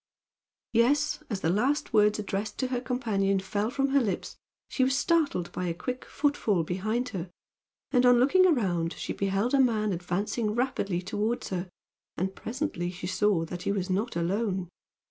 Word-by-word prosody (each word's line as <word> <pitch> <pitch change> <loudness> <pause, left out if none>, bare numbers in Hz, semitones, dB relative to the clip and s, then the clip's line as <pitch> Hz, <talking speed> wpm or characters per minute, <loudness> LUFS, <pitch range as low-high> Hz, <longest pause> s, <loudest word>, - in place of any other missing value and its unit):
Yes, 285 +7 +2
as 200 -4 -3
the 160 - +2
last 265 +9 0
words 210 -1 +4
addressed 210 0 -3
to 260 - -1
her 250 -1 -1
companion 210 -6 0
fell 205 +3 -1
from 275 +2 0
her 275 0 +4
lips 200 -7 -3 0.3
she 260 - 0
was 265 +1 +2
startled 290 - +1
by 180 - -3
a 170 - -2
quick 250 +8 -5
footfall 225 - +1
behind 215 +9 -1
her; 185 -5 -5 0.6
and 250 -2 +4
on 245 -1 +6
looking 370 +9 +5
around 180 - +1
she - - -4
beheld 200 +5 0
a 275 - +4
man 215 -5 +2
advancing 200 +5 -2
rapidly 200 -8 -1
toward 210 +5 -1
her, 185 -1 -3 0.5
and 190 +2 -1
presently 235 - -3
she 180 0 -7
saw 185 -1 +1
that 175 +2 -6
he - - -1
was 190 -2 -2
not 210 +6 -1
alone. 185 +1 -1
210 Hz, 170 wpm, -28 LUFS, 185-250 Hz, 0.6 s, on